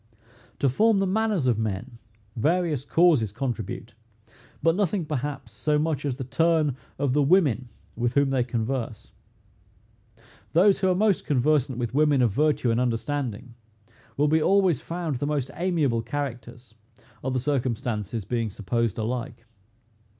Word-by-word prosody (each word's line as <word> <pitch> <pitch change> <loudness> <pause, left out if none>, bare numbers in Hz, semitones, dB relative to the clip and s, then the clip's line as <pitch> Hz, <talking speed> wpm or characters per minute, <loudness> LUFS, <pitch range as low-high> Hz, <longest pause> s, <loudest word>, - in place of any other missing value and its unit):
To 140 - +1
form 215 - +3
the 195 - +2
manners 205 -5 0
of 120 -4 +2
men, 110 +3 -4 0.4
various 155 +1 0
causes 150 - +3
contribute; 115 -1 -4 0.7
but 165 +1 +4
nothing, 190 -3 0
perhaps, 145 -1 -4
so 150 -1 0
much 150 -2 -1
as 130 -3 -2
the 135 - -4
turn 155 +1 +1 0.2
of 140 -2 0
the 145 - +3
women 140 - +3 0.3
with 120 +1 -1
whom 140 -1 +3
they 130 -2 +2
converse. 120 -1 -3 1.4
Those 190 +4 +5
who 190 - +2
are 180 - +2
most 205 0 +1
conversant 140 -2 +2
with 120 -1 -3
women 145 -2 +3
of 115 - +2
virtue 145 0 +1
and 115 - +1
understanding, 120 -1 -2 0.6
will 145 +2 +3
be 160 +1 +3
always 185 -5 +3
found 165 -4 -3
the 145 - -2
most 145 -3 -2
amiable 155 -10 0
characters, 120 -2 -6 0.5
other 130 0 -1
circumstances 120 -5 -2
being 115 +1 -1
supposed 115 +2 -2
alike. 115 0 -4
135 Hz, 145 wpm, -25 LUFS, 120-155 Hz, 1.4 s, Those